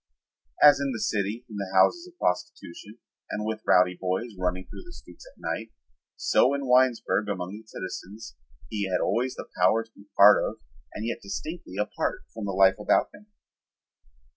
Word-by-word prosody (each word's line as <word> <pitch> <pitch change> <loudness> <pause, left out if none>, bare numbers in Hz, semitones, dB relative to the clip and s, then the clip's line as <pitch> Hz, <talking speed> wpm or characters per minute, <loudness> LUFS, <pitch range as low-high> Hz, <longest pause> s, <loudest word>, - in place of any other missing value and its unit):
As 145 -1 +8
in 140 -1 -1
the 115 - -5
city 105 +4 -2
in 105 - -9
the 100 -2 -4
houses 345 - +4
of 360 -1 -18
prostitution 90 - -4 0.3
and 105 0 -3
with 110 0 -3
the - - -40
rowdy 90 0 +5
boys 95 +5 -2
running 95 0 -2
through - - -11
the 350 - -14
streets - - -14
at - - -19
night, - - -4 0.4
so 135 +3 +3
in 140 -1 -4
Winesburg 125 -4 +2
among 90 -1 -4
its 110 0 -19
citizens 95 - -8 0.3
he 100 -3 -3
had 90 - +1
always 125 +2 0
the - - -8
power 110 +5 +4
to 115 - -25
be 100 -2 -19
a - - -59
part 105 +1 +7
of - - -3 0.4
and 110 - -4
yet 115 - -3
distinctly 125 - -7
apart 105 - -2
from 110 -2 -6
the 100 - -2
life 95 +1 +4
about 105 - +2
him. 205 0 -16
105 Hz, 190 wpm, -26 LUFS, 95-125 Hz, 0.4 s, As